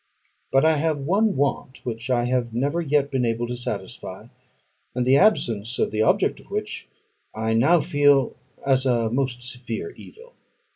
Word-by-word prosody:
But 135 +3 +4
I 160 -1 +4
have 155 0 0
one 195 +9 +1
want 135 -1 -2
which 115 0 -5
I 120 -2 +2
have 120 -2 -1
never 145 +7 0
yet 145 -2 +1
been 130 -2 0
able 115 0 0
to 125 +1 -4
satisfy; 105 -6 -5 0.7
and 125 -1 0
the 130 +2 +5
absence 120 - +2
of - - 0
the 110 0 0
object 110 - +2
of - - -18
which - - -4 0.5
I 110 +1 -1
now 150 +9 +4
feel 145 -2 +3 0.3
as 135 -1 +3
a 115 -3 +1
most 125 -1 -1
severe 125 - -5
evil. 480 +4 -15
130 Hz, 165 wpm, -23 LUFS, 120-145 Hz, 0.7 s, the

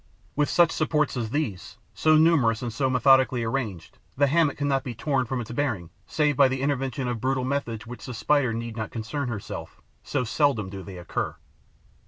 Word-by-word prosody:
With 150 0 +1
such 170 -1 +4
supports 150 -2 0
as 115 -3 -2
these, 110 -6 -3 0.2
so 155 +9 +4
numerous 140 -9 +3
and 120 -2 -3
so 130 +3 0
methodically 130 -1 +4
arranged, 115 -8 -4 0.2
the 145 - +5
hammock 150 0 +2
cannot 140 -2 0
be 125 -2 -5
torn 130 +1 0
from 130 +1 -2
its 115 -1 -6
bearings 115 - -2 0.2
save 150 -2 +1
by 140 +1 +6
the 130 0 -2
intervention 135 -1 -1
of 120 -3 -3
brutal 130 +1 0
methods 130 -5 -2
with 120 +2 -8
which - - -10
the 125 - -5
Spider 135 +1 +2
need 115 0 -4
not 110 -2 -4
concern 115 +5 -4
herself, 110 -4 -6 0.2
so - - -1
seldom 115 -5 +1
do 100 -1 -6
they 95 -1 -9
occur. 85 -2 -3
130 Hz, 195 wpm, -26 LUFS, 115-145 Hz, 0.2 s, by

